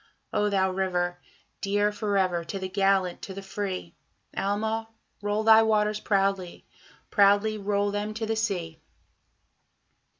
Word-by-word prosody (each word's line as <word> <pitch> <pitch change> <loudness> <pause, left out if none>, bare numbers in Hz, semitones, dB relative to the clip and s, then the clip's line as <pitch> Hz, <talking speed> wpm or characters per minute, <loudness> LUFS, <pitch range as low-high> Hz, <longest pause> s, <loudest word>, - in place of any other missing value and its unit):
O 210 0 +2
thou 190 -2 +2
river! 180 -2 -1 0.4
dear 205 +1 +1
for 210 -1 -1
ever 180 -3 +1
to 195 - -5
the 190 -1 -4
gallant, 195 -1 +1
to 190 - -7
the 195 - -7
free, 190 - -4 0.4
Alma! 220 +3 -1 0.3
roll 205 +1 0
thy 220 0 +8
waters 215 -1 +2
proudly, 195 -3 0 0.5
proudly 205 +1 +4
roll 205 0 0
them 205 +1 -3
to 220 0 -2
the 225 0 -1
sea! 175 -8 -2
200 Hz, 135 wpm, -27 LUFS, 190-210 Hz, 0.5 s, thy